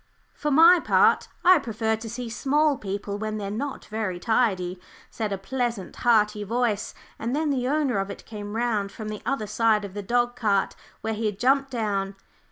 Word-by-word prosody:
"For 300 - -3
my 330 +5 +7
part, - - +3 0.2
I 365 -1 +8
prefer 220 -3 -1
to 225 +1 -8
see 240 +2 -5
small 285 +6 +2
people 200 0 -4
when 215 0 -3
they're 200 -1 -4
not 270 +6 -4
very 210 -5 -3
tidy," 190 -6 0 0.3
said 215 -2 -3
a 195 - -1
pleasant, 235 0 -3
hearty 210 -3 +2
voice; 220 -1 -1 0.2
and 235 +4 -2
then 305 0 0
the 250 -2 0
owner 280 -6 +1
of 195 +1 -2
it - - -9
came 205 -1 -7
round 220 -4 0
from 215 -1 -7
the 210 -1 -6
other 270 -4 0
side 215 0 +2
of 195 - -9
the 205 - -4
dog 240 +4 0
cart 205 -5 +1 0.3
where 220 0 -2
he 220 0 -1
had 205 -2 -3
jumped 270 +4 +2
down. 200 -5 -2
220 Hz, 190 wpm, -25 LUFS, 205-250 Hz, 0.3 s, I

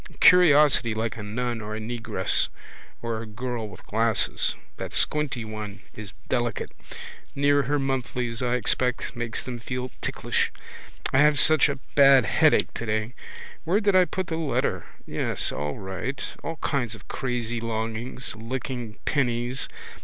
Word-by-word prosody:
Curiosity 150 -9 +6
like 110 -2 -2
a 110 - -7
nun 115 +2 -3
or 105 0 -5
a - - -4
negress 115 +1 +1 0.6
or 115 -1 -2
a 115 - -7
girl 115 0 -4
with - - -13
glasses. 115 +1 +1 0.2
That - - -5
squinty 145 -6 +1
one 105 -3 -7
is 105 -4 -8
delicate. 120 -3 -1 0.6
Near 145 0 +4
her 145 +2 0
monthlies, 125 -3 -2
I 125 0 +1
expect, 125 0 0
makes 120 -1 -3
them 125 -2 -5
feel 125 +2 -4
ticklish. - - 0 0.6
I 130 - +5
have 150 -1 +5
such 155 -2 +5
a 140 - -2 0.2
bad 135 -3 +7
headache - - +3
today. 110 +1 -2 0.5
Where 180 +5 +2
did 200 -3 +2
I 185 -1 +7
put 185 +1 -3
the 160 -1 -3
letter? 155 -4 -1 0.2
Yes, - - 0
all 75 0 -3
right. 95 +8 -4 0.2
All 165 - -3
kinds 125 -8 -1
of 105 - -15
crazy 120 -3 -2
longings. 115 +2 -3
Licking 120 -1 -5
pennies. 125 -2 0
120 Hz, 145 wpm, -26 LUFS, 110-135 Hz, 0.6 s, bad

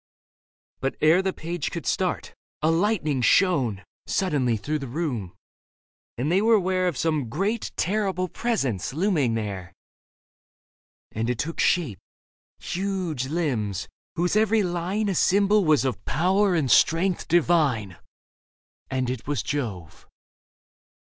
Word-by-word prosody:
But 135 0 -2
ere 160 +4 +5
the 190 0 0
page 170 -3 -4
could - - -6
start, - - -1 0.3
a 160 - +4
lightning 165 - +1
shone 125 - +2 0.2
Suddenly 135 -11 +1
through 150 +8 -2
the 135 - -6
room, 120 - -3 0.8
and 135 +7 -1
they 190 +3 +3
were 225 0 +5
'ware 185 0 0
Of 170 -7 -2
some 155 -7 0
great 200 - -2
terrible 190 -1 0
presence 140 - -2
looming 155 - +1
there. 100 -5 -5 1.4
And 115 +2 -2
it 125 - -1
took 165 +7 -4
shape 145 - +1 0.4
— - - -85
huge 180 -8 -3
limbs, 130 - -2 0.3
whose 175 +3 0
every 220 0 +3
line 180 +4 -1
A 195 - 0
symbol 200 +3 +3
was 150 -5 +3
of 130 -5 -2
power 185 +5 +2
and 145 -6 +1
strength 175 +3 +3
divine, 150 - +2 0.9
And 130 -1 -1
it 125 -2 -4
was 145 -1 -1
Jove. 105 - -5
160 Hz, 130 wpm, -25 LUFS, 125-185 Hz, 1.4 s, ere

